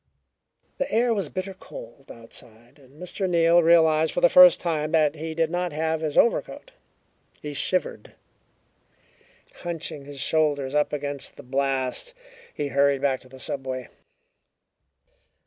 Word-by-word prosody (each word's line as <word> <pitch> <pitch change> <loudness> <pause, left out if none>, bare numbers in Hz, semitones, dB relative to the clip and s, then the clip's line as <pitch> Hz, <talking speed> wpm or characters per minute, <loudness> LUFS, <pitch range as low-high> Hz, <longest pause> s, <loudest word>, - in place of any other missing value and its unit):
The 275 - -2
air 235 +2 +2
was 195 -8 -2
bitter 185 +1 -5
cold - - -12
outside, 115 +3 -13
and 135 +2 -20
Mr. 185 +1 -3
Neal 170 0 +4
realized 160 -1 +4
for 175 - -1
the 175 - +6
first 180 -2 +8
time 155 -3 -2
that 155 -3 +3
he 160 +1 -6
did 165 0 0
not 175 0 -2
have 160 +1 -1
his 155 -2 -3
overcoat. 235 - +1 0.7
He 150 -1 -7
shivered. 185 +6 -1 1.4
Hunching 165 -4 -6
his 140 -1 -10
shoulders 145 -3 0
up 150 0 +1
against 145 -1 -4
the - - -11
blast, 135 - -2 0.4
he 145 -1 -4
hurried 140 0 +2
back 135 -2 +1
to 130 - -16
the 130 +1 -14
subway. 130 -2 -5
155 Hz, 140 wpm, -24 LUFS, 140-175 Hz, 1.4 s, first